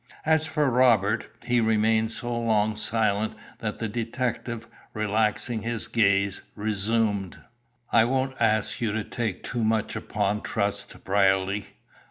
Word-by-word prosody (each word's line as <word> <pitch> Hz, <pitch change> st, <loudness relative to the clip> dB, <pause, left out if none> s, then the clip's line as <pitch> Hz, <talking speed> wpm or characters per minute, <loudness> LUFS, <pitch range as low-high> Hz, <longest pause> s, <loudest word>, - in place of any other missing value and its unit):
As 160 Hz, 0 st, +3 dB
for 150 Hz, -3 st, +1 dB
Robert, 115 Hz, -4 st, +3 dB, 0.2 s
he 120 Hz, -1 st, +2 dB
remained 110 Hz, 0 st, +2 dB
so 120 Hz, +1 st, -3 dB
long 110 Hz, -2 st, +1 dB
silent 110 Hz, -1 st, 0 dB, 0.2 s
that 105 Hz, -1 st, -3 dB
the 115 Hz, -, -2 dB
detective, 115 Hz, +1 st, -3 dB, 0.3 s
relaxing 110 Hz, +2 st, 0 dB
his 115 Hz, 0 st, -3 dB
gaze, 100 Hz, -3 st, +2 dB
resumed 105 Hz, -2 st, 0 dB, 0.5 s
"I 115 Hz, -1 st, +5 dB
won't 130 Hz, +1 st, 0 dB
ask 110 Hz, -2 st, +1 dB
you 110 Hz, -3 st, 0 dB
to 110 Hz, 0 st, -1 dB
take 110 Hz, -4 st, -3 dB
too 120 Hz, -2 st, -2 dB
much 110 Hz, -1 st, 0 dB
upon 105 Hz, 0 st, -1 dB
trust, 100 Hz, -1 st, -3 dB
Brierly. 95 Hz, +1 st, +2 dB
110 Hz, 130 wpm, -26 LUFS, 105-115 Hz, 0.5 s, I